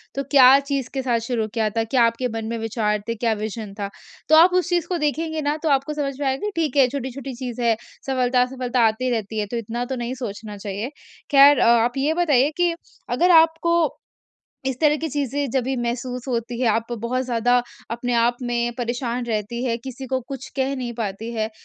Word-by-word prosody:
तो 275 - -1
क्या 270 -1 +8
चीज़ 275 -2 -3
के 270 - -1
साथ 245 -3 +1
शुरू 230 -1 -2
किया 220 -2 +1
था? 225 +2 -1
क्या 240 +2 +2
आपके 230 +2 0
मन 225 -2 -5
में 230 - -2
विचार 215 -1 -1
थे, 230 - -1
क्या 230 0 0
विज़न 215 -1 -5
था 200 -1 -3 0.4
तो 315 - +7
आप 345 +3 +7
उस 365 0 +1
चीज़ 345 -2 0
को 360 - -1
देखेंगे 315 +1 -1
न 295 +1 +1
तो 320 - +1
आपको 280 +2 +1
समझ 285 -2 -2
में 290 - -2
आएगा 270 +11 -1
ठीक 315 -3 -1
है 265 -2 +6
छोटी-छोटी 265 0 -5
चीज़ 245 -1 -5
है, 230 -1 +3 0.3
सफलता-असफलता 250 -1 +1
आती 235 +4 -1
रहती 220 -2 -2
है 210 - 0
तो 240 - -2
इतना 230 +2 -3
तो 265 +1 -4
नहीं 240 0 -3
सोचना 215 -4 -6
चाहिए। 205 +3 -4 0.4
ख़ैर 280 0 +7
अ, - - +4
आप 235 +2 +3
ये 285 +4 +1
बताइए 295 -6 +3
कि 350 -1 +2 0.4
अगर 355 +1 +3
आपको 330 0 +4 0.7
इस 265 -2 -2
तरह 300 -1 +5
की 320 - -3
चीज़ें 285 0 -2
जभी 265 +1 0
महसूस 245 +1 -3
होती 235 -1 -3
हैं 250 - +3
आप 225 +2 -1
बहुत 250 +3 -1
ज़्यादा 245 0 +2 0.3
अपने 240 +1 -2
आप 235 +1 +2
में 240 -1 -1
परेशान 245 0 -2
रहती 230 +1 -3
हैं, 235 -2 0
किसी 265 0 -7
को 260 +1 0
कुछ 270 -2 -6
कह 270 0 0
नहीं 245 -2 -4
पाती 220 +1 -4
हैं 220 -1 -1
250 Hz, 210 wpm, -22 LUFS, 230-275 Hz, 0.7 s, क्या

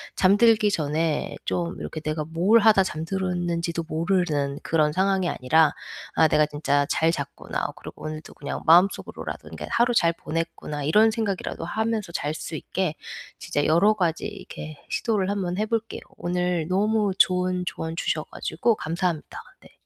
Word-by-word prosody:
잠들기 210 +2 +5
전에 155 -1 -1
좀 170 +1 -2
이렇게 155 - -5
내가 155 0 -2
뭘 175 +8 +4
하다 205 -3 +5
잠들었는지도 170 -1 -2
모르는 160 -4 0
그런 155 -2 +2
상황이 190 +1 +1
아니라 155 +4 +3 0.4
'아 160 - +5
내가 150 0 +3
진짜 145 -1 0
잘 160 +1 +3
잤구나.' - - -4
그리고 - - -11
오늘도 155 0 -7
그냥 145 - -5
마음속으로라도 175 +5 +2
그니까 - - -7
'하루 240 +1 +3
잘 170 -5 +4
보냈구나.' 165 -3 -4
이런 210 +9 +5
생각이라도 205 -7 -3
하면서 220 0 -2
잘 150 -1 -2
수 - - -7
있게 180 +1 -2 0.5
진짜 145 -4 -1
여러 170 +7 +4
가지 170 -5 0
이렇게 155 -1 -9
시도를 205 -5 0
1 200 -1 -1
번 180 -1 -2
해 215 - +1
볼게요. 225 0 -3 0.2
오늘 180 -2 -1
너무 205 +1 +2
좋은 180 -1 +2
조언 160 -1 -4
주셔 - - -1
가지고 235 -2 -1
감사합니다. 170 -2 -3 0.2
네. - - -18
175 Hz, 350 characters per minute, -25 LUFS, 155-195 Hz, 0.5 s, 잠들기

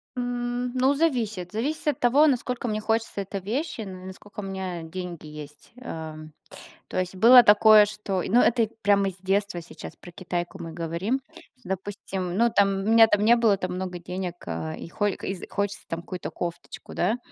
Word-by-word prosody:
М, 245 0 -2
ну, 260 +2 +3
зависит. 225 - 0
Зависит 285 +10 -2
от 285 - -2
того, 265 +5 +5
насколько 250 -2 -1
мне 215 -1 -1
хочется 225 -1 -1
этой 195 0 -5
вещи, 240 - -3
ну, 185 -3 -8
и - - -10
насколько 205 +3 -11
у - - -4
меня 190 -3 -5
деньги 175 -1 -7
есть. 150 -1 -11
Эм, 155 -10 -8 0.6
то - - -4
есть 185 0 -2
было 245 +6 +9
такое, 210 -1 +7
что 205 -3 -3
и - - -5
ну, 240 +4 +5
и - - +4
это 240 0 +3
и 220 - -1
прямо 200 -1 +3
из 185 - -6
детства 195 -1 -1
сейчас, 170 - -10
про 175 - -12
Китайку 175 +1 -4
мы 165 -1 -7
говорим. 170 +10 -2 0.4
Допустим, 190 -1 -4
ну, 235 +2 +3
там 200 -2 +4 0.2
у - - -2
меня 225 0 +8
там 205 -1 +2
не 235 +2 +6
было 225 -4 +3
там 185 -1 -3
много 180 -1 -4
денег, 180 0 -5
а 80 -1 -4
и 80 - -8
хо 205 +5 -1
из 190 -1 -4
хочется 200 +1 -2
там 165 - -3
какую-то 180 +1 -6
кофточку, 170 -1 -7
да, 195 +7 +1
200 Hz, 200 wpm, -25 LUFS, 180-230 Hz, 0.6 s, было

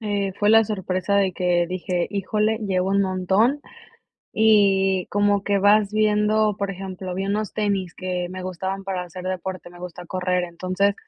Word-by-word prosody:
Eh, 205 -3 -1
fue 205 - +2
la 225 0 +6
sorpresa 190 -1 -1
de 195 -2 +2
que 175 -1 +1
dije: 180 -1 -2
"Híjole, 210 +2 0
llevo 190 -4 -1
un 200 0 +3
montón", 190 +9 +1 0.7
y 195 -4 +3
como 205 -1 +2
que 200 0 +1
vas 205 +1 +4
viendo, 215 0 +2
por 200 -1 -2
ejemplo, 185 -1 -6
vi 195 +1 -2
unos 210 0 -2
tenis 200 -4 -1
que 180 -1 -3
me 185 0 -6
gustaban 190 +2 -4
para 190 -2 -3
hacer 180 +1 -9
deporte, 185 -1 -5
me 175 - -14
gusta 180 0 -8
correr. 180 0 -1
Entonces, 185 +3 -1
195 Hz, 170 wpm, -23 LUFS, 185-205 Hz, 0.7 s, la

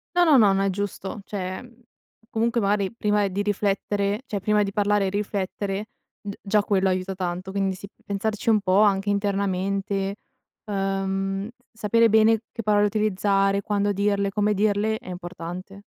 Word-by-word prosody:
No, 355 - +5
no, 300 -5 +6
no, 205 -4 +6
no, 195 - +1
è 195 - +2
giusto. 200 +1 -4
Cioè, 185 -2 -4
ehm, 245 -1 -12 0.6
comunque 230 +1 0
magari 200 +1 +1
prima 210 -2 +1
di 200 +2 -2
riflettere, 205 +1 0
cioè 205 - -2
prima 210 0 +2
di 200 -1 -1
parlare 205 -1 +2
e - - 0
riflettere 200 0 -3 0.4
d 200 -1 -6
già 210 +1 +2
quello 195 -2 +1
aiuta 185 +1 -2
tanto. 180 0 -4
Quindi 195 -1 0
sì, 195 +2 -9 0.2
pensarci 210 +2 -2
un 215 -1 +5
po' 190 +2 +3
anche 200 -1 +3
internamente. 200 0 -1 0.5
Ehm, 195 0 -2 0.2
sapere 230 +1 +3
bene 220 +1 +4
che 230 - -5
parole 210 -1 +3
utilizzare, 200 -1 +1
quando 205 0 0
dirle, 200 0 +1
come 210 +1 +1
dirle 210 +2 +1
è 215 - -11
importante. 180 +2 -7
200 Hz, 160 wpm, -24 LUFS, 195-210 Hz, 0.6 s, no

